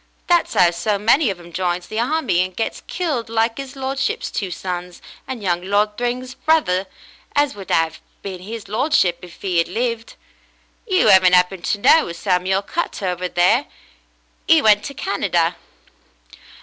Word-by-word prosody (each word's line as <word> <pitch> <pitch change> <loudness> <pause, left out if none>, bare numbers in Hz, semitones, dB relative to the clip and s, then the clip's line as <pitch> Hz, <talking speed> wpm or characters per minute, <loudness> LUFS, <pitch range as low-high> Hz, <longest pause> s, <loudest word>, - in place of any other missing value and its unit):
That's 345 -1 +2
'ow 175 -1 +5
so 190 +5 -1
many 230 +6 +3
of 190 -3 -4
'em 170 0 -14
joins 175 0 -1
the 215 - -7
harmy 245 - +1
and 185 0 -3
gets 225 - -3
killed 290 -11 -2
like 225 +2 0
'is 275 0 -7
lordship's 270 0 -2
two 195 - -3
sons, 180 0 -5 0.3
and 250 -5 -6
young 175 -2 0
Lord 205 +3 0
Thryng's 250 +2 -3
brother 195 -13 +1 0.5
as 290 -1 +2
would 195 -3 -9
'ave 165 -1 +1 0.2
been 190 -2 -6
'is 215 +3 -8
lordship, 205 - +1
if 175 -1 -14
'e' 180 -3 +1
ad - - -3
lived. 230 +3 -3 0.7
You 375 - +3
'aven't 185 -1 +6
'appened 180 0 +1
to - - 0
know 315 +10 +5
a 170 - -6
Samuel 190 +1 0
Cutter 205 - -3
over 180 0 -3
there? 185 +11 +2 0.8
'E 325 0 +7
went 210 -6 +4
to 280 - -7
Canada. 175 -6 0
200 Hz, 165 wpm, -20 LUFS, 180-250 Hz, 0.8 s, E